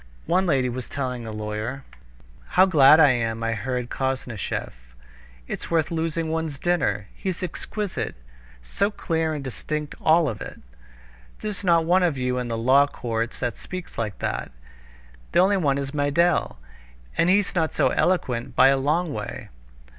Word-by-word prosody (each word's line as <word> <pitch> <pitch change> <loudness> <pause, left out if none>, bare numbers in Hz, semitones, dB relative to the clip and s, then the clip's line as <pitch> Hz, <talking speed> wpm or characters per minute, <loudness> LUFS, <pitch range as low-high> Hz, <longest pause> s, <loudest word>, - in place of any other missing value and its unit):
One 185 +2 +2
lady 135 -5 +2
was 125 0 -5
telling 125 -4 -4
a - - -5
lawyer: 110 +5 -4 0.7
"How 185 - +8
glad 155 -4 +7
I 145 -4 +7
am 115 -2 -1
I 115 0 0
heard 125 +2 -3
Koznishev! 130 -5 -3 0.8
It's - - -5
worth 160 -1 +1
losing 165 0 -1
one's 160 -2 -2
dinner. 175 - 0
He's 185 -1 -4
exquisite! 205 +3 -4 0.5
So 200 - 0
clear 160 -6 -1
and 145 - -5
distinct 150 +4 -4
all 160 0 +4
of 110 -6 -4
it! - - -8 0.8
There's 210 -2 -4
not 170 -3 +4
one 180 +3 +4
of 170 -6 +1
you 125 0 -1
in 125 - -3
the 115 -1 -2
law 130 +5 +5
courts 115 -3 -3
that 120 -4 -2
speaks 185 -1 -8
like 105 -3 -3
that. - - -3 0.8
The - - +4
only 195 +2 +4
one 140 -6 +1
is 140 0 -4
Meidel, 150 - +1 0.6
and 170 - +3
he's 200 +1 +3
not 160 -3 +1
so - - +2
eloquent 125 -10 0
by 135 - +7
a 135 - +3
long 155 +4 0
way." 105 -1 -6
145 Hz, 160 wpm, -24 LUFS, 125-170 Hz, 0.8 s, How